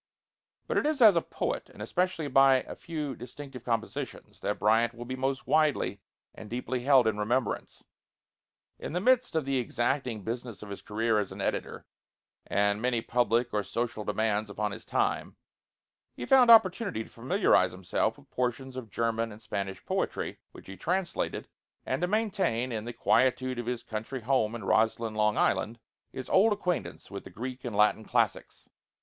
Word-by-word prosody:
But - - +1
it - - 0
is 305 -2 0
as 215 -6 +8
a 170 - +3
poet, - - -3
and - - -16
especially 165 - -1
by 135 -1 +5
a - - -8
few 150 -5 -4
distinctive 125 0 -9
compositions, 115 -2 -4
that 105 - -2
Bryant 115 +3 +3
will 120 +1 -7
be 130 +2 -4
most 135 +1 -2
widely 145 -10 +2 0.3
and 105 - -10
deeply 125 +2 -2
held 130 -1 +5
in 110 -2 0
remembrance. 120 +4 -1 1.0
In - - -6
the 180 - 0
midst 250 0 +3
of 160 -3 +1
the 135 -1 +1
exacting 120 -2 -1
business 115 -1 -5
of 105 - -9
his 100 - -7
career 110 +1 0
as 100 - -3
an - - -9
editor, - - -3 0.6
and 100 +1 +1
many 120 -2 0
public 120 0 +1
or 105 - +2
social 110 +2 -3
demands 105 0 0
upon 105 +1 -2
his - - -8
time, - - -1 0.8
he 120 - -5
found 255 - +6
opportunity 200 - +5
to - - -16
familiarize 125 - +2
himself 95 +4 -1
with 140 -1 -20
portions 125 +1 -2
of 125 -4 -7
German 115 +1 -1
and 105 - -11
Spanish 100 -3 -5
poetry, - - -2
which - - -14
he 95 - -9
translated, 185 +1 -2 0.4
and - - -1
to 180 - +2
maintain 190 - 0
in 110 -1 -3
the 120 - -4
quietude 130 +1 +2
of 120 - -5
his 125 -1 -2
country 115 +4 -5
home 115 -2 +1
in 120 - -6
Roslyn, 110 0 +1
Long 105 0 +1
Island, 115 +2 +1 0.3
his 130 - -6
old 210 +3 +5
acquaintance 180 - -3
with 100 - -6
the - - -10
Greek 125 +2 -6
and 120 -4 -4
Latin 105 +1 +3
classics. - - -1
120 Hz, 175 wpm, -29 LUFS, 110-140 Hz, 1.0 s, as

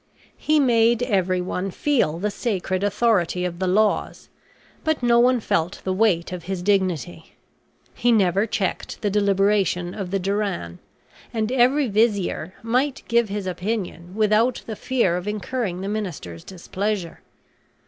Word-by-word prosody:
He 305 0 +2
made 235 -3 +3
everyone 185 -3 0
feel 210 - 0
the 205 +4 -2
sacred 195 -4 -2
authority 205 -4 +1
of 175 -1 -4
the 190 - 0
laws, 210 +3 +1 0.5
but 315 -5 0
no 235 -1 +4
one 250 +1 +4
felt 170 -4 -1
the 190 - -1
weight 185 -5 +1
of 180 -2 -6
his 185 -1 -4
dignity. 180 -4 -1 0.6
He 240 0 +1
never 200 -1 +3
checked 210 -1 -3
the 205 - +1
deliberation 195 -3 +1
of 195 -4 -5
the 195 +1 -1
diran; 190 - -2 0.5
and 220 0 -1
every 260 +3 +3
vizier 205 -5 0
might 255 +4 0
give 235 -2 +2
his 200 -1 -3
opinion 185 -2 -4
without 220 +3 +2
the 220 - -5
fear 210 -8 +1
of 180 +3 -6
incurring 210 -2 -3
the 195 - -4
minister's 175 - -5
displeasure. 190 0 -4
200 Hz, 140 wpm, -23 LUFS, 180-230 Hz, 0.6 s, no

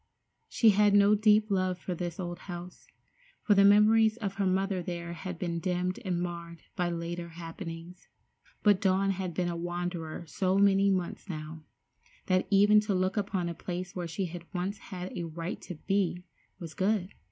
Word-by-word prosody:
She 225 -2 +5
had 205 0 +4
no 205 +1 +6
deep 210 0 +4
love 185 -2 +1
for 180 - -4
this 175 0 -5
old 175 -1 -4
house, 175 -1 -9 0.6
for 210 - +4
the 200 0 +5
memories 215 +2 +5
of 200 -5 -3
her 200 -1 +1
mother 190 0 0
there 170 -1 -5
had 180 +1 -6
been 170 -1 -2
dimmed 180 +1 -1
and 180 -2 -1
marred 170 -1 -6
by 175 -1 0
later 170 0 -4
happenings; 165 +1 -8 0.6
but 205 -2 +4
Dawn 195 0 +2
had 185 -3 -4
been 180 0 0
a 175 - -2
wanderer 175 -1 -4
so 185 +4 0
many 200 0 +4
months 185 +1 -2
now, 155 -1 -7 0.6
that 185 -1 +1
even 205 +1 +6
to 210 -2 -1
look 185 +1 0
upon 195 -4 -1
a 170 - -3
place 180 +1 -6
where 175 -2 -3
she 185 +4 -3
had 175 0 -9
once 190 +3 -2
had 185 -3 -7
a 175 - -3
right 165 +2 -5
to 180 - -7
be, 185 0 -1 0.3
was 165 -3 -8
good. 190 +3 0
185 Hz, 180 wpm, -29 LUFS, 170-200 Hz, 0.6 s, no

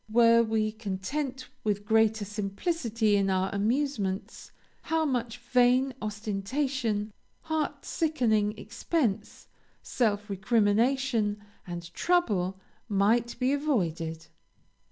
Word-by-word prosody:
Were 230 +1 +6
we 220 -1 0
content 250 +6 -4 0.2
with 205 -1 -1
greater 220 -1 +3
simplicity 215 - -1
in 195 -1 +2
our 190 0 0
amusements, 210 -2 -1 0.3
how 320 -1 0
much 245 -4 -1
vain 250 +2 +3
ostentation, 215 +2 -2 0.3
heart 315 -2 -2
sickening 225 -10 +1
expense, 225 - -2 0.4
self 210 -4 0
recrimination, 220 +2 +1 0.3
and 170 -1 -7
trouble, 200 - +1 0.3
might 220 +4 +2
be 255 +2 +1
avoided! 170 - -1
220 Hz, 95 wpm, -28 LUFS, 205-260 Hz, 0.4 s, Were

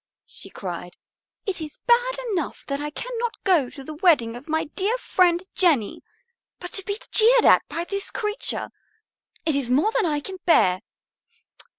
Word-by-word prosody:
she - - -10
cried. 180 -2 -7 0.5
"It 385 -5 -2
is 305 -2 -7
bad - - +3
enough 340 -8 -3
that 280 0 -3
I 295 - -3
cannot 475 +7 -4
go 335 -10 +3
to 275 - -11
the 310 - -7
wedding 300 -9 +3
of 270 +6 -11
my 315 +1 +1
dear 400 +9 -2
friend 360 -7 +2
Jenny. 300 - +2 0.6
But 355 - -8
to 390 - -3
be 405 +2 -3
jeered 470 +2 +5
at - - +7
by 335 - -3
this 395 +3 -3
creature, 425 -2 -2 0.7
it 315 -3 +1
is 275 -4 -1
more 290 - +3
than 455 -6 +1
I 295 -2 0
can 380 +6 -7
bear. 185 - +4
340 Hz, 170 wpm, -24 LUFS, 285-420 Hz, 0.7 s, at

